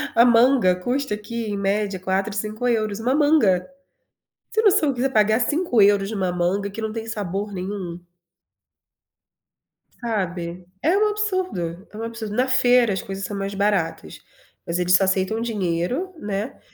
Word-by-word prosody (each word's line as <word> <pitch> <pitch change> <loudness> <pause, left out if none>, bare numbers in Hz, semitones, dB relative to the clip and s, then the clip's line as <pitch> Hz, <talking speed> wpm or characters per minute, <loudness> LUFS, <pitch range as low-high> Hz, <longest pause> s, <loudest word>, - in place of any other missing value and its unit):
a 235 - +7
manga 240 -5 +5
custa 245 +7 -2
aqui 220 +2 -5
em 205 - -2
média 200 -1 -1
4, 190 +2 -1
5€, 215 0 -1
uma 245 +3 0
manga. 290 - +4 0.9
Você 440 - +1
tem - - -4
noção 305 -9 +2
quiser 260 +2 0
pagar 215 +1 +3
5€ 220 - +3
em - - -4
uma 185 -3 -1
manga 185 +3 -1
que 225 - -7
não 220 -1 -3
tem 225 0 -5
sabor 205 -2 -4
nenhum? 185 -2 -5 2.0
Sabe. 180 -6 -3 0.2
É 345 +6 +3
um 425 0 +3
absurdo, 370 - -2
é 210 - -11
um 225 - -5
absurdo. 230 -2 -5
Na 255 +2 +2
feira, 250 -4 +4
as 190 - -2
coisas 195 0 -5
são 205 - -5
mais 195 0 -3
baratas, 190 - -1 0.5
mas 170 - -2
eles 180 0 +2
só 195 +1 +5
aceitam 190 +4 0
dinheiro, 220 - -2
né. 205 +4 -4
210 Hz, 160 wpm, -22 LUFS, 190-245 Hz, 2.0 s, a